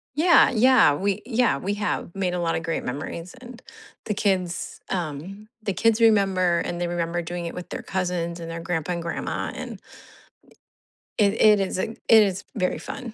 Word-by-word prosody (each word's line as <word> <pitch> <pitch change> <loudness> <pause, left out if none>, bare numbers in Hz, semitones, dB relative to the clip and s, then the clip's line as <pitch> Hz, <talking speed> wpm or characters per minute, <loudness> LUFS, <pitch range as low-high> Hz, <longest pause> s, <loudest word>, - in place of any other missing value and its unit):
Yeah, 340 +1 +6
yeah, 255 - +5
we, 195 +6 -1
yeah, 235 - +2
we 190 +8 -2
have 205 -4 -3
made 190 -2 -1
a 180 - -2
lot 170 -1 0
of 165 - -3
great 165 0 -2
memories, 155 +7 -5
and 250 -1 -12 0.4
the 210 - -1
kids 185 -4 -1
um, 180 +4 -5 0.2
the 200 - -1
kids 225 +3 +2
remember, 195 -6 +3
and 175 - -4
they 175 - 0
remember 175 0 -2
doing 175 +1 -5
it 170 - -5
with 180 - -8
their - - -5
cousins 180 -2 -3
and 165 0 -6
their 165 - -5
grandpa 170 0 -2
and 170 - -4
grandma, 165 0 -3
and - - -7 1.4
i - - +6
it 200 +2 +1
it 210 -1 +6
is 195 -1 -1
it 220 +4 -4
is 200 -4 +5
very 185 -4 0
fun. 250 -5 -7
185 Hz, 185 wpm, -24 LUFS, 170-215 Hz, 1.4 s, Yeah